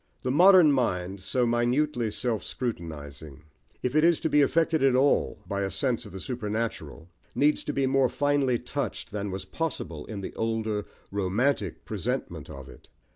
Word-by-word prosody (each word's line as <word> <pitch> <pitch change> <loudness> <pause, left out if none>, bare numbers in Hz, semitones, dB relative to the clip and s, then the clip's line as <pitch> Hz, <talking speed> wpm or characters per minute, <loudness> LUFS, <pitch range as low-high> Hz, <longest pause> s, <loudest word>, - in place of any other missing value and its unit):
The 125 - 0
modern 180 +1 +7
mind, 95 -8 0
so 120 +6 0
minutely 120 +1 +1
self 115 0 -2
scrutinising, 75 - -6 0.4
if 125 - -1
it 155 +1 +4
is 170 -1 +4
to 160 - 0
be 150 - +5
affected 160 +2 +2
at 135 -2 +4
all 135 +2 +2
by 100 0 -2
a 95 - -1
sense 125 -1 -1
of - - -12
the 95 - -7
supernatural, 105 - -4 0.3
needs 150 +1 +2
to - - -1
be 140 -2 0
more 135 -1 +3
finely 145 -2 +1
touched - - -4
than 105 -1 -3
was 95 0 -5
possible 85 - -4
in 105 -3 -6
the - - -6
older, 110 -2 -2 0.2
romantic 100 - 0
presentment - - -4
of 70 -1 -9
it. - - -15
120 Hz, 170 wpm, -27 LUFS, 100-140 Hz, 0.4 s, modern